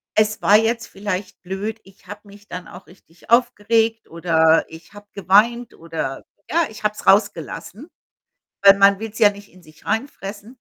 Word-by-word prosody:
es 215 0 +1
war 205 +1 +6
jetzt 230 +1 -1
vielleicht 195 -1 -6
blöd, 200 +4 -5
ich 195 -1 -21
habe 205 +1 -9
mich 205 0 -17
dann 180 -1 -8
auch 180 +2 -13
richtig 175 -1 -22
aufgeregt 225 -1 +1
oder 165 -1 +2
ich 160 +1 -14
habe 205 0 -14
geweint 220 +5 +2
oder 160 -5 -6 0.3
ja, 335 +1 +2
ich 215 - -13
habe 210 0 0
es - - -11
rausgelassen.“, 195 - 0 0.7
weil 195 0 +8
man 200 0 +5
will's 220 0 -7
ja 210 -2 +6
nicht 205 -1 -13
in 185 -2 -19
sich 155 0 -20
reinfressen. 210 -4 -4
205 Hz, 170 wpm, -20 LUFS, 180-220 Hz, 0.7 s, weil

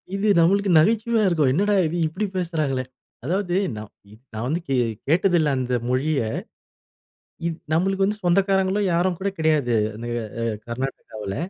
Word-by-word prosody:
இது 200 +2 0
நம்மளுக்கு 195 +4 +3
நகைச்சுவையா 225 +4 +2
இருக்கும். 155 -7 +2
என்னடா 205 +5 +2
இது 170 +3 -3
இப்டி 185 +7 -3
பேசுறாங்களே. 155 -7 -1 0.4
அதாவது 180 +2 -1 0.2
நான் 105 -1 -8 0.2
இ - - -14 0.2
நான் 110 +2 -4
வந்து 165 +5 -1
கே 135 - +2 0.3
கேட்டதில்ல. 170 -1 +3
அந்த 125 -1 -1
மொழிய. 140 +4 +1 1.3
இது 170 -1 -1 0.2
நம்மளுக்கு 195 +3 +1
வந்து 210 +1 -2
சொந்தக்காரங்களும் 190 +2 +2
யாரும் 175 0 +1
கூட 200 +1 -1
கிடையாது. 150 -7 +2 0.2
அந்த 115 +2 -7
எ 115 - -4 0.2
அ - - -1 0.2
கர்நாட்டகாவுல. 115 -5 -5
170 Hz, 145 wpm, -23 LUFS, 135-195 Hz, 1.3 s, நம்மளுக்கு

